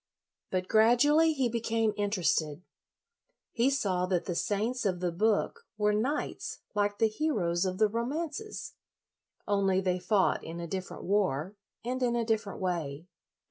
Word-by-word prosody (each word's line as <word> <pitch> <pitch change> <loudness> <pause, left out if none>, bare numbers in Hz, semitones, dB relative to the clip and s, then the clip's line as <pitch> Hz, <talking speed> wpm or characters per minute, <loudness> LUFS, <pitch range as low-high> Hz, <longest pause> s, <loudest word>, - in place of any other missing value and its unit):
But 185 0 -1
gradually 275 +9 +5
he 270 -4 +1
became 225 -2 0
in 205 0 0
56 185 -5 +2
LOYOLA 150 -2 -7
terested. - - -24 0.9
He 240 +3 +2
saw 190 -9 0
that 180 -2 0
the 180 - -2
saints 215 +8 -1
of 185 -4 0
the 180 -1 -1
book 220 - 0
were 210 0 +2
knights 255 +8 -2 0.2
like 205 -1 0
the 225 - +4
heroes 210 - 0
of 185 0 -2
the 215 +1 +4
romances, 305 - -4 0.7
only 195 -2 +2
they 185 -1 0
fought 190 +1 +2
in 165 +1 -6
a 170 - -4
different 185 +2 -5
war 190 -3 0 0.3
and 255 +2 -2
in 240 -1 +2
a 235 -1 0
different 220 -2 -1
way. 165 -5 -3
210 Hz, 160 wpm, -30 LUFS, 185-235 Hz, 0.9 s, gradually